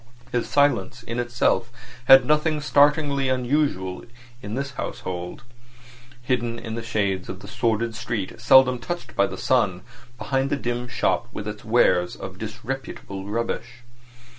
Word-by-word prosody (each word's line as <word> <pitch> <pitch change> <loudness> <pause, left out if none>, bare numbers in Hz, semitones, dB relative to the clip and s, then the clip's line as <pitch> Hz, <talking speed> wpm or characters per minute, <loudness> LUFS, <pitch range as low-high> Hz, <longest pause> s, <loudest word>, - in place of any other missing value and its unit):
His 120 - -1
silence 140 -3 +1
in 115 +1 -4
itself 120 -1 +1 0.3
had 135 +1 +8
nothing 150 +1 +2
startlingly 145 -2 +3
unusual 125 -8 0 0.4
in 105 0 -5
this 140 +1 -3
household, 90 -6 -5 0.8
hidden 120 -2 -1
in 115 -1 -6
the 115 - -3
shades 100 -4 -1
of 95 0 -7
the 100 - -10
sordid 115 +2 0
street 110 -2 -4
seldom 130 0 +6
touched 175 +7 -6
by 100 - +3
the - - -7
sun, 100 -8 +1 0.3
behind 135 +1 -1
the - - +1
dim 120 -1 -3
shop - - 0
with 105 - -6
its 105 0 -6
wares 95 -6 +3
of 95 0 -9
disreputable 110 -3 -6
rubbish. 115 +2 -3
120 Hz, 140 wpm, -24 LUFS, 105-135 Hz, 0.8 s, had